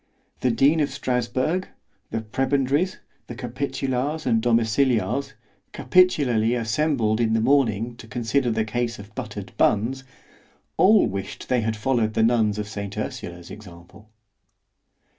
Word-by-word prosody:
The 130 - +1
dean 135 +7 +3
of 145 -1 +1
Strasburg, 130 +6 -1 0.4
the 115 - -3
prebendaries, 135 - 0 0.3
the 120 - -7
capitulars 135 +3 -3
and 115 -3 +2
domiciliars 120 +3 +1 0.4
(capitularly 130 -11 +3
assembled 115 -1 0
in 110 -1 +1
the 115 - +2
morning 115 -3 +1
to 110 - -12
consider 120 +2 0
the 110 -1 0
case 120 +1 -2
of 100 +1 -12
butter'd - - -7
buns) 120 +6 +1 0.7
all 210 +2 +5
wished 95 0 -5
they 125 -2 +2
had 110 0 -2
followed 110 -2 0
the 110 - +3
nuns 110 -3 +2
of 105 -1 -3
saint 100 -2 -6
Ursula's 85 0 -6
example. 100 +1 -13
120 Hz, 130 wpm, -24 LUFS, 110-135 Hz, 0.7 s, all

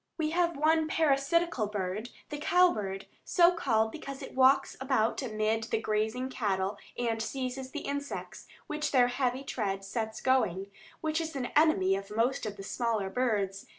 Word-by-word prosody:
We 310 -2 0
have 340 -2 +1
one 315 +1 +3
parasitical 310 -3 +2
bird, 205 +2 -3 0.2
the 295 - -5
cow 360 +4 +5
bird, 195 -2 -4 0.2
so 345 -1 +5
called 220 -8 +1
because 275 -2 -7
it - - -8
walks 265 +1 +4
about 260 -3 +1
amid 220 -2 -1
the 225 - 0
grazing 220 +4 -1
cattle 200 -4 -1 0.2
and 230 -2 -1
seizes 260 +2 -4
the - - -5
insects 285 0 -5 0.2
which 300 0 -2
their 245 -2 +5
heavy 255 +1 -1
tread 195 -7 -3
sets 220 +2 -3
going, 200 -7 +1 0.3
which 315 +1 0
is 320 -2 -5
an 255 -3 -2
enemy 240 -12 +4
of 195 0 -6
most 230 +2 0
of 205 - -6
the 195 - -7
smaller 215 -2 -1
birds. 205 -6 -1
245 Hz, 165 wpm, -30 LUFS, 215-285 Hz, 0.3 s, cow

